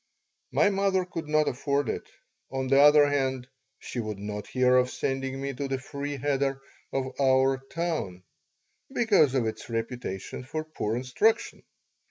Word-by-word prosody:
My 205 - +4
mother 195 -1 +1
could 165 -3 -6
not 155 0 +3
afford 140 +2 0
it. - - -4 0.4
On 135 0 -2
the 135 +1 +4
other 145 0 +7
hand, 130 -3 -1 0.3
she 125 - -6
would 110 -3 -3
not 105 +1 -5
hear 125 0 +3
of 125 0 +3
sending 135 0 -2
me 140 0 -3
to 140 +2 -3
the 135 0 -1
free 140 +2 -5
cheder 135 0 0 0.3
of 130 -1 -1
our 130 0 +4
town, 160 - -3 0.7
because 205 - +3
of 125 -3 +2
its 110 +1 -5
reputation 115 -2 -4
for 155 +5 -4
poor 115 -8 -3
instruction. 170 - +1
135 Hz, 155 wpm, -27 LUFS, 125-150 Hz, 0.7 s, other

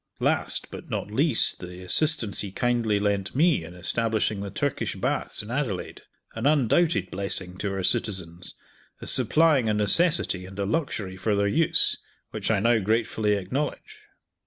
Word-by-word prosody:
Last, - - -1
but - - -10
not 105 - -4
least, 135 +2 +2
the 90 0 -9
assistance 130 - +3
he 100 - -5
kindly 115 -2 0
lent 100 0 -1
me 160 +2 +3
in 90 - -10
establishing 110 +2 -1
the 100 - -5
Turkish - - -2
Baths - - -2
in 105 - -9
Adelaide 125 -8 -3 0.3
an 115 +4 -1
undoubted 155 +4 +2
blessing 95 -2 -1
to 100 - -2
our 95 -1 -3
citizens, 90 -6 -1 0.4
as - - 0
supplying 150 -7 +3
a 105 - +1
necessity 105 - +2
and 95 +1 -12
a 100 - -1
luxury 105 - -3
for 105 +3 0
their 100 0 +1
use 160 +10 +3 0.3
which - - -3
I 110 -3 +2
now 115 +2 +3
gratefully 110 0 0
acknowledge. 145 - -4
105 Hz, 160 wpm, -25 LUFS, 95-135 Hz, 0.4 s, assistance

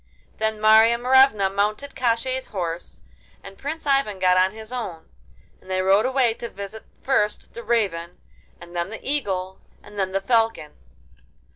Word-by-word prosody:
Then 220 0 -1
Marya 220 +2 +6
Morevna 250 -4 +4
mounted 210 +8 -1
Koshchei's 255 +1 -1
horse 175 -3 -5 0.4
and 195 0 -11
Prince 305 +8 -6
Ivan 275 -8 +1
got 185 -1 +3
on 185 +1 +4
his 220 +2 -10
own, 200 -10 -6 0.5
and 185 - -18
they 185 0 0
rode 195 +5 +4
away 260 -3 +2
to 235 +1 -7
visit 200 +2 -9 0.2
first 210 -6 0
the 235 - -7
Raven, 190 -8 -1 0.4
and 175 0 -13
then 170 +2 -2
the 225 - -8
Eagle, 190 -10 -2 0.2
and 205 - -10
then 190 -1 0
the 195 - 0
Falcon. 225 -6 0
215 Hz, 155 wpm, -23 LUFS, 190-240 Hz, 0.5 s, Marya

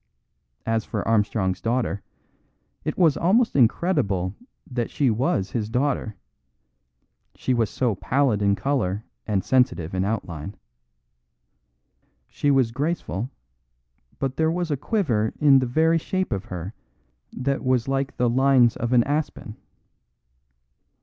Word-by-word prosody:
As 115 -1 0
for - - -4
Armstrong's 105 -4 +1
daughter, 115 -4 -1 0.8
it - - -3
was 165 -5 +4
almost 220 +8 +2
incredible 110 - +2 0.3
that 120 -3 -3
she 135 -5 +1
was 110 -4 0
his 110 -3 -2
daughter; 125 -3 -1 1.2
she 130 - -1
was 115 -3 +1
so 125 -4 0
pallid 125 +1 +1
in 100 0 +3
colour 110 -7 -1 0.2
and 100 -4 0
sensitive 125 -10 +1
in 95 0 0
outline. 95 -4 -4 1.7
She 145 - -1
was 130 -4 +3
graceful, 130 - -2 0.9
but 135 -1 -3
there 160 0 +2
was 175 -1 -2
a - - +2
quiver 130 - 0
in 140 -2 +6
the 130 - -1
very 160 +6 +3
shape 185 +3 -2
of 95 - -4
her 90 +3 -6 0.6
that 135 +2 -2
was 130 -2 +1
like 135 0 -2
the 125 - +2
lines 130 -1 +4
of 120 +2 -2
an 120 -1 +5
aspen. 145 -6 -3
125 Hz, 130 wpm, -24 LUFS, 105-140 Hz, 1.7 s, in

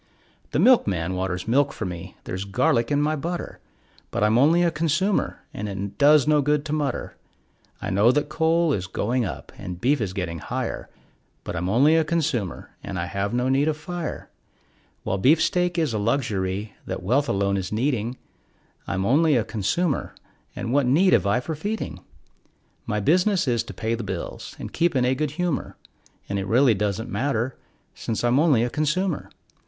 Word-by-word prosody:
The - - -2
milkman 95 - +3
waters 90 0 -3
milk 140 +4 +3
for 110 - -5
me; 90 0 -7
there's 95 +1 -4
garlic 115 +5 +1
in 145 0 +2
my 155 +1 +1
butter, 170 +4 -5 0.5
But - - -1
I'm 105 +1 +3
only 160 +8 +5
a 170 - +2
consumer, 165 +5 0
and 105 +1 -4
it 100 0 -5
does 150 0 +6
no 150 -1 +4
good 150 +1 +1
to 150 - -3
mutter; 145 -4 -2 0.7
I - - -2
know 100 +5 +5
that 145 +2 0
coal 160 +1 +2
is 95 -5 -2
going 120 +5 -1
up 95 - -7
and 90 -1 -6
beef 135 +4 +2
is 95 -4 -2
getting 85 -4 -3
higher, - - -4 0.5
But - - -5
I'm 90 +2 -2
only 140 +9 +4
a 160 - +4
consumer, 150 - -2
and - - -5
I 85 - -1
have 100 +3 -2
no 125 +1 0
need 135 +3 +2
of 155 -1 0
fire; 170 +1 -5 0.8
While 95 - -1
beefsteak 170 - +3
is 160 -7 +1
a 110 - -1
luxury 100 -4 -1
that - - -4
wealth 135 +9 +1
alone 100 0 +1
is 95 -2 -3
needing, 120 +1 -1 0.7
I'm 95 0 -1
only 150 +6 +4
a 120 - +2
consumer, 115 - -1 0.4
and 115 - -3
what 140 -2 +3
need 175 +9 +4
have - - +3
I 120 +5 +2
for 160 - -4
feeding? 205 +8 -4 0.9
My 105 - 0
business 180 - +2
is 120 -2 +2
to - - -8
pay 110 0 -2
the 115 0 -3
bills 95 -3 -6
and - - -8
keep 170 -2 +1
in 125 -1 +3
a 125 - +3
good 150 +3 -1
humor, 180 -5 -2 0.5
And 100 0 -2
it 95 - -3
really 125 +3 +4
doesn't 105 +2 -2
matter, 120 +2 -1 0.4
since 115 0 -3
I'm 120 +3 +3
only 145 -8 +4
a 120 - 0
consumer. 155 +4 -1
125 Hz, 185 wpm, -24 LUFS, 100-155 Hz, 0.9 s, does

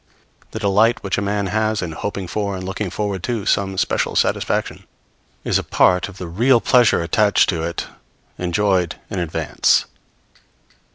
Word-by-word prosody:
The - - -7
delight 110 +4 +2
which 100 - -1
a - - -2
man 100 0 -1
has 110 +2 0
in 85 - -4
hoping 95 +3 -5
for 100 +1 -2
and 95 - -6
looking 95 +1 -4
forward 100 0 -3
to 115 -5 -3
some 95 -1 0
special - - 0
satisfaction - - -1 0.6
is - - +1
a - - -5
part 90 +1 +2
of 100 - -13
the 90 - -6
real 120 +9 +3
pleasure 120 -8 +3
attaching 105 +4 +3
to 80 - -3
it 85 0 -3 0.5
enjoyed 90 -1 0 0.2
in 100 - -2
advance. 85 -3 +1
100 Hz, 160 wpm, -20 LUFS, 90-105 Hz, 0.6 s, real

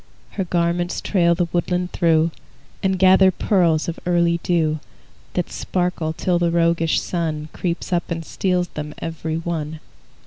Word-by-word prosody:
Her 195 - -2
garments 175 0 0
trail 170 -4 +2
the 175 0 +1
woodland 180 +1 0
through, 165 -1 +3 0.5
And 190 -1 +1
gather 190 +1 +6
pearls 175 -4 +2
of 170 - -4
early 170 -1 +2
dew 160 -3 +1 0.6
That 180 - -1
sparkle 180 -3 -1
till 175 +1 0
the 175 -1 +2
roguish 170 -1 +2
Sun 155 -3 -3
Creeps 175 +1 -3
up 175 - 0
and 165 -1 -3
steals 180 -1 0
them 150 0 -6
every 160 -1 -3
one. 160 -2 -4
170 Hz, 145 wpm, -21 LUFS, 165-180 Hz, 0.6 s, gather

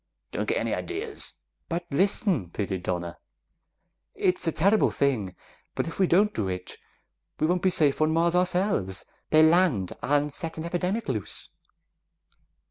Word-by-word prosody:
Don't - - -2
get - - +1
any - - -1
ideas!" 410 +3 -4 0.3
"But 170 0 -2
listen!" 180 - +1
pleaded 95 -1 -3
Donna. 85 -1 -3 1.0
"It's 180 -2 +1
a - - +3
terrible 200 +7 +3
thing, 110 -10 0 0.4
but - - -1
if 165 - -7
we 190 - +4
don't 205 +5 +3
do 105 - -1
it, 90 -1 -5 0.6
we 155 - +2
won't 175 +2 +1
be 185 - +3
safe 155 -6 +2
on 155 0 +3
Mars 170 +1 +2
ourselves; 180 - 0 0.2
they'll 155 0 +6
land 160 - +3
and 145 +1 +1
set 165 +1 -5
an 160 - -4
epidemic 180 +6 -1
loose." 110 -7 -4
165 Hz, 150 wpm, -27 LUFS, 110-185 Hz, 1.0 s, they'll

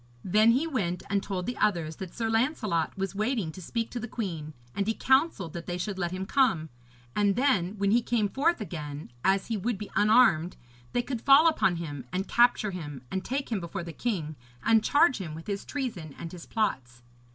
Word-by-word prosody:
Then 215 +5 +5
he 270 +6 +1
went 195 - -2
and 200 -1 +2
told 190 -3 -3
the 245 - -3
others 170 -7 +1
that 185 -3 -8
Sir 230 -2 -1
Lancelot 225 - 0
was 195 -1 -2
waiting 215 -4 -1
to 185 - -10
speak 230 +6 -3
to 245 - -4
the 240 - -5
queen, 165 -10 -4 0.2
and 200 0 -1
he 225 - +1
counselled 265 - +2
that 170 -1 -7
they 175 - -2
should 190 +1 -4
let 175 -2 0
him 185 +2 -4
come, 195 - +2 0.5
and 205 -1 +3
then 215 -7 +1
when 200 0 +1
he 235 +2 +4
came 225 -2 +1
forth 285 - +1
again, 150 - -6
as 195 0 +3
he 225 - -2
would 225 +2 -1
be 210 +1 -8
unarmed, 205 -6 +4 0.4
they 245 - +1
could 245 -3 -4
fall 280 +5 +7
upon 250 - +3
him 145 -5 -5
and 190 +2 -2
capture 240 -3 +3
him, 145 -8 -7
and 190 0 -2
take 270 0 -3
him 215 - 0
before 170 +1 -5
the 170 -1 -7
king 165 -8 -2 0.3
and 225 -1 +4
charge 290 -4 +4
him 160 -5 -5
with 165 - -9
his 200 -1 -3
treason 205 - -5
and 165 - -7
his 175 -2 -10
plots. 125 - -2
200 Hz, 210 wpm, -28 LUFS, 170-235 Hz, 0.5 s, fall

